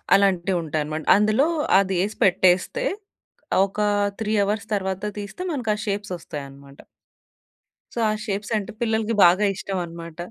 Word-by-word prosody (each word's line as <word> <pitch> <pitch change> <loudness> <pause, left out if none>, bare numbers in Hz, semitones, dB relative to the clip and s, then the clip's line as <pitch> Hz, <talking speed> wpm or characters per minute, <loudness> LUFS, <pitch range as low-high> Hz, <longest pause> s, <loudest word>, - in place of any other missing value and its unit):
అలాంటివి 190 -2 +2
ఉంటాయనమాట. 155 0 -3
అందులో 215 +8 +3 0.3
అది 190 -1 0
ఏసి 210 +2 -4
పెట్టేస్తే 185 - +2 0.8
ఒక 200 +2 -8 0.4
3 215 0 -1
అవర్స్ 205 +1 -2
తర్వాత 190 -1 -3 0.2
తీస్తే 205 - -7
మనకి 245 -8 -1
ఆ - - -8
షేప్స్ 205 0 -3
వస్తాయనమాట. 140 -3 -10 1.1
సో, - - -4
ఆ - - +2
షేప్స్ 205 0 -3
అంటే 210 +2 -5
పిల్లలకి 225 -1 0
బాగా 185 +4 +5
ఇష్టం 195 0 -4
అనమాట. 165 -1 -10
195 Hz, 135 wpm, -23 LUFS, 170-210 Hz, 1.1 s, బాగా